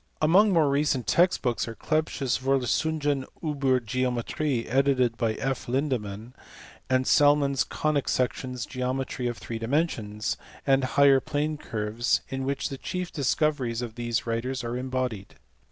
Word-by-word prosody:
Among 190 Hz, +7 st, +5 dB
more 165 Hz, -5 st, +4 dB
recent 140 Hz, -3 st, +1 dB
text 175 Hz, -, +3 dB
books 120 Hz, -2 st, 0 dB
are 115 Hz, -, -6 dB
Clebsch 155 Hz, 0 st, -1 dB
s 125 Hz, -2 st, +1 dB
Vorlesuny 135 Hz, +2 st, 0 dB
// -, -, -29 dB
iiSer 135 Hz, -5 st, +1 dB
Geometric, 125 Hz, +2 st, -1 dB
edited 130 Hz, -2 st, +2 dB
by 115 Hz, -2 st, 0 dB
F. 135 Hz, +1 st, -3 dB
Lindemann; 120 Hz, -4 st, -2 dB, 0.6 s
and 130 Hz, 0 st, +2 dB
Salmon 145 Hz, 0 st, +4 dB
s 135 Hz, -, +2 dB
Conic 150 Hz, -2 st, -1 dB
Sections, 125 Hz, -1 st, -1 dB
Geometry 130 Hz, 0 st, -3 dB
of 120 Hz, -1 st, -3 dB
Three 115 Hz, -1 st, -6 dB
Dimensions, 115 Hz, -5 st, -1 dB, 0.3 s
and 135 Hz, -1 st, +3 dB
Higher 140 Hz, 0 st, +5 dB
Pln< 150 Hz, 0 st, -2 dB
Curves; 110 Hz, +1 st, -1 dB
in 135 Hz, 0 st, -3 dB
which 140 Hz, 0 st, -1 dB
the 135 Hz, -, -6 dB
chief 180 Hz, -1 st, -4 dB
discoveries 135 Hz, -4 st, 0 dB
of 115 Hz, -2 st, -6 dB
these 120 Hz, 0 st, -2 dB
writers 120 Hz, +3 st, -2 dB
ait 120 Hz, -, -3 dB
embodied. 125 Hz, -5 st, -3 dB
130 Hz, 150 wpm, -27 LUFS, 120-145 Hz, 0.6 s, Among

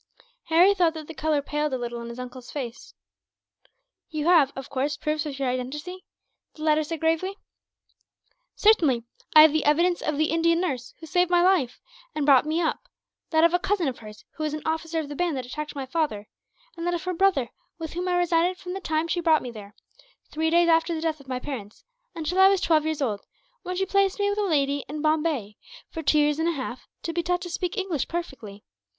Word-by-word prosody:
Harry 350 Hz, +5 st, +5 dB
thought 345 Hz, -4 st, +2 dB
that 310 Hz, -1 st, -7 dB
the 325 Hz, -, -9 dB
colour 300 Hz, 0 st, 0 dB
paled 295 Hz, +1 st, -1 dB
a 260 Hz, -, -1 dB
little 240 Hz, -1 st, -5 dB
in 235 Hz, -, -7 dB
his 235 Hz, -, -8 dB
uncle's 250 Hz, 0 st, -8 dB
face. 255 Hz, -4 st, -7 dB, 1.1 s
"You 310 Hz, -2 st, -3 dB
have, 325 Hz, -6 st, +5 dB
of 270 Hz, 0 st, -7 dB
course, 285 Hz, +2 st, -2 dB
proofs 305 Hz, +1 st, -2 dB
of 280 Hz, -2 st, -6 dB
your 275 Hz, -1 st, -1 dB
identity?" 295 Hz, +9 st, -4 dB, 0.5 s
the 310 Hz, -, -9 dB
latter 310 Hz, 0 st, +3 dB
said, 325 Hz, +1 st, -5 dB
gravely. 330 Hz, +5 st, 0 dB, 1.2 s
"Certainly. 315 Hz, -, +4 dB, 0.3 s
I 310 Hz, -, +11 dB
have 310 Hz, -1 st, +6 dB
the 315 Hz, -, +1 dB
evidence 340 Hz, +4 st, +2 dB
of 305 Hz, -2 st, -1 dB
the 310 Hz, +1 st, +1 dB
Indian 335 Hz, +1 st, +2 dB
nurse 270 Hz, -9 st, -3 dB
who 325 Hz, -, -9 dB
saved 355 Hz, +3 st, +1 dB
my 350 Hz, -1 st, +4 dB
life, 355 Hz, -10 st, +2 dB, 0.4 s
and 300 Hz, -2 st, -1 dB
brought 280 Hz, 0 st, +5 dB
me 315 Hz, +2 st, 0 dB
up; 325 Hz, -2 st, -2 dB, 0.4 s
that 320 Hz, -1 st, +3 dB
of 335 Hz, 0 st, +5 dB
a 355 Hz, -, +3 dB
cousin 385 Hz, -3 st, 0 dB
of 260 Hz, -, -3 dB
hers, 215 Hz, -1 st, -12 dB
who 310 Hz, -, -3 dB
was 305 Hz, -1 st, -1 dB
an 305 Hz, -, -7 dB
officer 320 Hz, +1 st, -2 dB
of 310 Hz, -, -4 dB
the 290 Hz, -, -7 dB
band 340 Hz, -2 st, -1 dB
that 255 Hz, -, -4 dB
attacked 300 Hz, +4 st, -6 dB
my 275 Hz, -2 st, -4 dB
father; 260 Hz, -8 st, -2 dB, 0.5 s
and 335 Hz, 0 st, -4 dB
that 350 Hz, -, +1 dB
of 340 Hz, -, -5 dB
her 365 Hz, 0 st, -2 dB
brother, 340 Hz, -9 st, +2 dB, 0.3 s
with 325 Hz, -2 st, -6 dB
whom 355 Hz, +2 st, -3 dB
I 360 Hz, -, +1 dB
resided 350 Hz, +1 st, +2 dB
from 360 Hz, -1 st, -7 dB
the 385 Hz, -, -4 dB
time 315 Hz, -1 st, -1 dB
she 345 Hz, -, -1 dB
brought 320 Hz, -2 st, +3 dB
me 250 Hz, -, -6 dB
there 210 Hz, -2 st, -11 dB, 0.6 s
three 320 Hz, +1 st, 0 dB
days 340 Hz, +1 st, +4 dB
after 330 Hz, 0 st, +3 dB
the 315 Hz, -, -4 dB
death 320 Hz, -2 st, -1 dB
of 275 Hz, -, -16 dB
my 255 Hz, -1 st, -2 dB
parents 240 Hz, -7 st, -7 dB, 0.3 s
until 335 Hz, +3 st, -2 dB
I 380 Hz, -, +9 dB
was 395 Hz, -1 st, +2 dB
twelve 315 Hz, -3 st, +2 dB
years 315 Hz, -2 st, -1 dB
old, 210 Hz, -6 st, -2 dB, 0.4 s
when 365 Hz, -1 st, -5 dB
she 385 Hz, +1 st, 0 dB
placed 395 Hz, 0 st, +1 dB
me 405 Hz, 0 st, +2 dB
with 410 Hz, -, -2 dB
a 415 Hz, -, +1 dB
lady 285 Hz, -5 st, +1 dB
in 300 Hz, +1 st, -5 dB
Bombay, 305 Hz, -9 st, 0 dB, 0.3 s
for 325 Hz, -, -5 dB
two 305 Hz, 0 st, +2 dB
years 295 Hz, 0 st, +2 dB
and 325 Hz, -, +1 dB
a -, -, 0 dB
half, 255 Hz, -3 st, -6 dB, 0.2 s
to 335 Hz, -, -3 dB
be 345 Hz, -, 0 dB
taught 355 Hz, +1 st, -1 dB
to 355 Hz, -, -6 dB
speak 360 Hz, +4 st, -3 dB
English 375 Hz, -8 st, -1 dB
perfectly. 240 Hz, -12 st, -6 dB
315 Hz, 230 wpm, -25 LUFS, 275-345 Hz, 1.2 s, I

